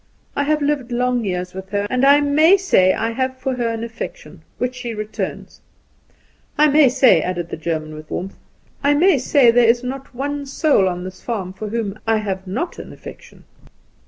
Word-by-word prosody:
I 285 - 0
have 305 0 +1
lived 285 -4 -1
long 245 0 0
years 180 -2 -3
with 190 0 -8
her, 205 0 -1
and 250 +3 -1
I 285 +1 +6
may 310 +6 +5
say, 265 - +3
I 225 +3 -1
have 260 +2 -2
for 265 0 -2
her 240 -2 0
an 230 0 -3
affection, 235 - -8 0.2
which 250 0 -2
she 245 -2 -6
returns. 215 0 -6 1.0
I 300 0 +5
may 290 -2 +5
say," 255 0 +4
added 175 -2 -3
the - - -4
German 155 -1 -3
with 155 0 -11
warmth, 190 +2 -5 0.4
"I 285 +1 +3
may 330 -1 +4
say, 255 -1 +4
that - - -8
there 230 - +4
is 240 +1 +2
not 265 +1 -6
one 285 +2 -3
soul 275 - +2
on 180 0 -5
this 185 0 -9
farm 195 -6 -4
for 210 +2 -6
whom 215 -2 -3
I 225 0 +3
have 195 -3 -4
not 335 - -4
an - - -9
affection." - - -13
240 Hz, 200 wpm, -20 LUFS, 195-280 Hz, 1.0 s, I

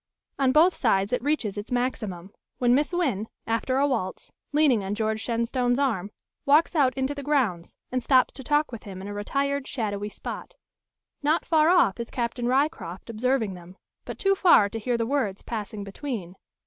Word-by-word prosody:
On 265 -2 +3
both 330 +6 +5
sides 200 -4 +1
it 250 - +1
reaches 245 -8 -1
its 205 - -9
maximum, 215 -7 -2 0.2
when 245 -1 +3
Miss 290 +5 +2
Wynn, 265 - 0 0.2
after 230 +3 0
a 280 +1 +3
waltz, 225 -9 -3 0.2
leaning 290 -8 +3
on 195 +2 -3
George 220 0 -1
Shenstone's 245 +2 0
arm, 225 -9 0 0.3
walks 305 +5 +4
out 275 -5 +3
into 265 +1 -1
the 285 - -6
grounds, 255 - 0 0.2
and 255 -1 -1
stops 255 0 +4
to 265 - -8
talk 295 +2 +1
with 230 - -7
him 190 -2 -9
in - - -6
a 205 - -5
retired, 275 +6 -1
shadowy 210 -5 -3
spot. - - -7 0.7
Not 305 +3 +1
far 315 -1 +4
off 345 - +4
is 235 - -4
Captain 240 -1 -2
Ryecroft 250 - -1
observing 230 -2 0
them, 180 +1 -12 0.3
but - - -7
too 390 0 +3
far 345 - +5
to 225 - -5
hear 240 +2 -1
the 230 - 0
words 230 -7 -1
passing 215 -2 -5
between. 200 - -6
245 Hz, 185 wpm, -26 LUFS, 205-280 Hz, 0.7 s, both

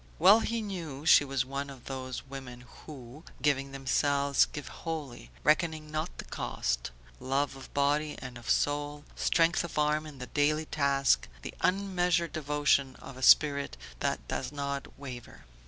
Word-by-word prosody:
Well 195 +7 +7
he 230 0 -2
knew 165 -8 -6
she 160 - +7
was 135 -2 -1
one 140 +1 -4
of 135 -3 -12
those 130 -2 -5
women 130 -3 -9 0.3
who, 140 0 -10 0.2
giving 135 0 +1
themselves, 140 +1 +2
give 145 - -8
wholly, 145 - -5
reckoning 155 0 +1
not 155 +3 -3
the - - -7
cost; - - -2 0.3
love 135 +1 -1
of 135 - -11
body 145 +2 +1
and 125 -1 -8
of 120 -1 -9
soul, 145 0 0
strength 170 +1 +2
of 170 - -7
arm 150 +1 +1
in 145 -2 -11
the 125 - -6
daily 150 +3 +1
task, 140 -2 +2 0.2
the - - -6
unmeasured 180 -2 +1
devotion 145 -3 +1
of - - -11
a 130 - -10
spirit 140 - +5 0.2
that - - -2
does 130 0 -3
not 140 -1 -3
waver. 130 -3 -9
145 Hz, 155 wpm, -30 LUFS, 135-155 Hz, 0.3 s, Well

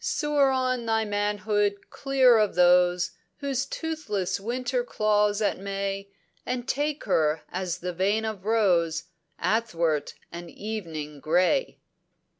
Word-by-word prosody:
"Soar 295 -12 +2
on 255 -2 0
thy 225 0 +1
manhood 205 0 -1
clear 260 -4 +4
of 210 -2 +1
those 180 0 +4 0.3
Whose 275 -2 -2
toothless 295 - -3
Winter 250 - -2
claws 210 - +1
at 205 - 0
May, 195 0 -4 0.3
And 250 0 -3
take 295 +2 -1
her 155 -5 +1
as 185 -1 -3
the 180 0 -4
vein 200 +5 +1
of 215 -4 -5
rose 180 -7 +2 0.4
Athwart 170 -10 0 0.2
an 170 0 -8
evening 165 -9 -6
grey." 180 - +1
205 Hz, 120 wpm, -26 LUFS, 180-250 Hz, 0.4 s, clear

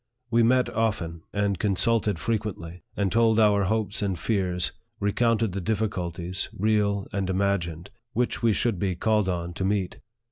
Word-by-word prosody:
We 115 0 +4
met 125 +2 +4
often, 90 -8 -1
and 100 -2 0
consulted 105 0 +2
frequently, 95 -5 -3 0.2
and 100 -2 +1
told 115 -1 +4
our 105 -2 +4
hopes 105 0 0
and 95 -3 -1
fears, 90 -3 0 0.3
recounted 115 +1 +1
the 100 +2 -3
difficulties, 90 -3 -2
real 100 -1 +1
and 100 -2 -1
imagined, 95 -3 -1 0.2
which 125 +1 0
we 115 -1 +4
should 110 -2 0
be 95 -2 0
called 105 +1 +1
on 85 -1 -3
to 95 - -4
meet. 95 -2 -1
100 Hz, 150 wpm, -26 LUFS, 90-110 Hz, 0.3 s, We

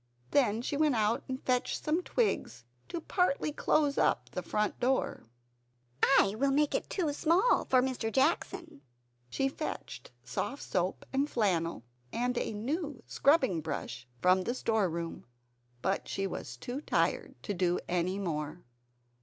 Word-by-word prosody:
Then 235 -4 +3
she 285 - -2
went 300 -2 +3
out 220 +4 +1
and 260 0 -4
fetched 250 -1 0
some 315 +4 +1
twigs, 420 - -1 0.2
to 340 - -4
partly 310 -4 +1
close 290 -1 +2
up 120 0 +1
the 180 - -3
front 210 +4 -1
door. 255 - 0 0.7
"I 200 -7 +5
will 275 +1 +3
make 290 +2 +2
it - - -1
too 325 -7 0
small 345 +11 +3
for 255 -1 +4
Mr. 250 -4 -1
Jackson!" 270 - 0 0.5
She 270 - 0
fetched 390 - -5
soft 280 - -3
soap, 180 +1 -1
and 275 +2 +1
flannel, 170 - 0 0.3
and 245 +1 0
a - - -2
new 270 - -3
scrubbing 260 - +3
brush 125 -6 -5 0.2
from 185 +1 +5
the 240 +7 -2
storeroom. 180 - -1 0.6
But 195 +1 0
she 195 - -2
was 125 -9 -5
too 245 - -5
tired - - 0
to 205 - -2
do 180 -1 +1
any 180 +2 0
more. 160 -3 -3
240 Hz, 145 wpm, -31 LUFS, 185-280 Hz, 0.7 s, I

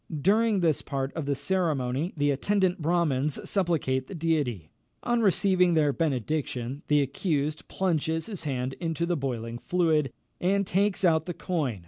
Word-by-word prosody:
During 210 +4 +3
this 160 -4 +2
part 135 -1 -3
of 160 -4 -4
the 140 - +1
ceremony 155 -3 -1
the 145 0 +2
attendant 185 +5 +1
Brahmins 155 -4 +1
supplicate 155 -9 0
the - - -7
Deity. 145 - -1 0.3
On 240 -1 +1
receiving 185 -3 +3
their 150 -3 +3
benediction, 140 -3 -2
the 150 -1 +4
accused 150 +1 -2
plunges 165 -3 -1
his 205 -5 -6
hand 130 -2 -2
into 165 -1 -1
the 175 0 0
boiling 120 -5 -4
fluid, 160 -4 +1 0.3
and 200 +2 +1
takes 195 +1 +1
out 160 -1 +3
the 175 - -4
coin. 145 - -2
160 Hz, 150 wpm, -27 LUFS, 135-180 Hz, 0.3 s, the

